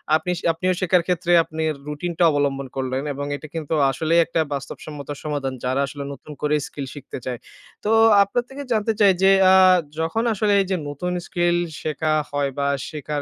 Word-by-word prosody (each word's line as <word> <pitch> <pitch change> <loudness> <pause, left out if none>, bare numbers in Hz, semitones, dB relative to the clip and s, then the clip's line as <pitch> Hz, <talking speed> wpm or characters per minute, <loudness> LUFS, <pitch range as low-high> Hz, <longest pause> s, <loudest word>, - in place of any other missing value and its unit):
আপনি 160 - -2
শে - - -9
আপনিও 185 +3 0
শেখার 180 -1 +3
ক্ষেত্রে 175 -1 0
আপনি 160 0 -5 0.2
রুটিনটা 170 +3 -2
অবলম্বন 140 -2 -1
করলেন 130 +1 -2
এবং 140 +1 -4
এটা 155 - -9
কিন্তু 160 0 -3 0.2
আসলেই 160 +5 +1
একটা 165 0 -2
বাস্তবসম্মত 140 +1 -7 0.2
সমাধান 145 -3 -2
যারা 130 +2 +1
আসলে 140 0 -7
নতুন 140 +2 -12
করে 150 0 +1
skill 140 -6 -6
শিখতে 145 - -8
চায়। 125 -2 -4 0.5
তো 215 - +1 0.3
আপনার 220 +5 -1
থেকে 280 +2 -8
জানতে 220 0 +1
চাই 200 -2 +6
যে 195 - +7 0.2
আ - - +6 0.5
যখন 165 +8 0
আসলে 210 0 +1
এই - - -1
যে - - +2
নতুন 160 +5 -4 0.2
skill 175 -1 +1 0.3
শেখা 155 +1 -1 0.2
হয় 145 -1 0
বা 140 - +1 0.2
শেখার 150 -1 -4
155 Hz, 180 wpm, -22 LUFS, 140-180 Hz, 0.5 s, যে